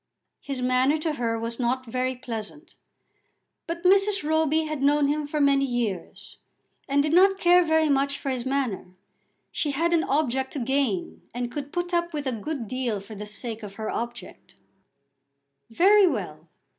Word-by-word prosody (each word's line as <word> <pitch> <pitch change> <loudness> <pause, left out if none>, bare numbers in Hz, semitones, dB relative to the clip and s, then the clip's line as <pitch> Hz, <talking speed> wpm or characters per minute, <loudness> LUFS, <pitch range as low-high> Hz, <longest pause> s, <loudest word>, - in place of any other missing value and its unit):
His 270 -3 -5
manner 255 +4 +3
to 310 0 -2
her 230 -4 -1
was 230 +1 -5
not 255 +1 0
very 255 +2 -2
pleasant, 245 +6 -7 0.9
but 335 +1 -5
Mrs. 390 -2 +3
Roby 315 0 +2
had 310 -3 -4
known 285 +1 +3
him 295 0 -1
for 300 +1 -2
many 280 -1 +4
years, 240 -8 -4 0.5
and 285 +1 +3
did 305 +1 -1
not 390 +2 +5
care 355 -1 +5
very 320 -1 +2
much 280 0 +1
for 275 - -3
his 250 -2 -3
manner. 255 -9 -2 0.6
She 300 - -1
had 330 +5 0
an 335 -1 +3
object 265 -2 0
to 285 - -3
gain, 250 -7 -1
and 245 0 -3
could 285 0 -6
put 350 0 -3
up 345 0 0
with 295 -2 -3
a 260 - 0
good 245 +1 -4
deal 245 -3 -2
for 200 +3 -11
the 210 0 -7
sake 225 +1 -6
of 200 -2 -9
her 220 0 -4
object. 235 +1 -7 1.1
"Very 390 - +5
well. - - -4
275 Hz, 170 wpm, -25 LUFS, 240-315 Hz, 1.1 s, not